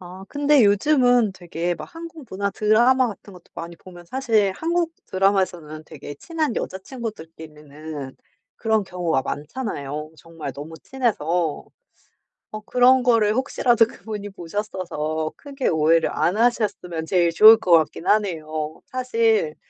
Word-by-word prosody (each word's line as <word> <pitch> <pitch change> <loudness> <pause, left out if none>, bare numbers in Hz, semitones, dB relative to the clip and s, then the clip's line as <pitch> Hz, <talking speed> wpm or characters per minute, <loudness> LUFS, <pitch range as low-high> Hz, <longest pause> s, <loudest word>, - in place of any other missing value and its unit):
아 185 +1 -10
근데 290 -4 +3
요즘은 245 0 +3
되게 175 -1 -3
막 - - -8
한국 330 -3 -10
문화 200 +1 -2
드라마 240 +5 +3
같은 200 -1 -10
것도 180 -2 -17
많이 170 +1 -7
보면 175 -1 -14
사실 220 -5 +1
한국 335 0 -1
드라마에서는 185 -5 0
되게 145 -1 -10
친한 310 - -3
여자 190 - -3
친구들끼리는 155 - -9 0.4
그런 220 -2 0
경우가 175 -7 -1
많잖아요 150 - -5
정말 165 -5 -8
너무 150 +4 -9
친해서. 180 - -1 0.9
어 215 - -4
그런 250 +1 +4
거를 225 -4 +3
혹시라도 240 -2 +2
그분이 210 -2 -8
보셨어서 170 -5 -4
크게 275 -2 -3
오해를 160 +1 +3
안 180 - 0
하셨으면 210 -8 0
제일 175 -1 +2
좋을 215 +6 +9
것 185 -5 -3
같긴 165 +2 +3
하네요. 155 -7 -1
사실 450 - 0
195 Hz, 305 characters per minute, -22 LUFS, 160-245 Hz, 0.9 s, 좋을